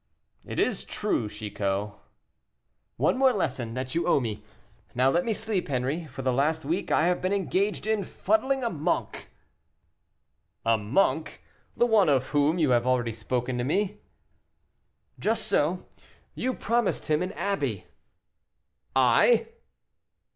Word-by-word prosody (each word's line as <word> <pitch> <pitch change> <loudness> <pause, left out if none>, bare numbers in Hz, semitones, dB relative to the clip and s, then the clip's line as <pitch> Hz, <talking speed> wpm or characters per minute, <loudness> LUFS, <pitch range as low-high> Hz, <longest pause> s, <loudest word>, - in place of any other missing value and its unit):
"It - - -7
is - - +1
true, 130 - -2
Chicot." 105 -1 -3 1.1
"One 255 - +2
more 265 -1 +5
lesson 125 - -2
that 130 0 -4
you 170 - 0
owe 175 - +4
me. 110 -5 -4 0.5
Now 130 +2 +4
let 175 +3 +2
me 230 - -1
sleep, 210 -5 -2
Henri; 140 +5 -1
for 135 -1 -8
the 130 -1 +1
last 155 +4 0
week 170 +7 -2
I 160 - +3
have 180 0 +1
been 185 - 0
engaged 200 +1 0
in 215 -2 +1
fuddling 270 - 0
a 235 - 0
monk." 155 +2 -2 1.4
"A 115 0 +4
monk! 135 - 0 0.3
the 240 - +4
one 215 -7 +4
of 130 -2 +2
whom 145 +3 +2
you 155 -6 +2
have 120 0 +2
already 125 -2 +1
spoken 125 +3 -2
to - - 0
me?" 205 +9 -1 1.2
"Just 225 +1 0
so. 170 +5 +1 0.5
You 255 0 -2
promised 235 -1 0
him 155 0 +1
an 180 +1 -2
abbey." 200 -1 -2 1.1
"I?" 470 -2 +4
155 Hz, 140 wpm, -27 LUFS, 125-200 Hz, 1.4 s, more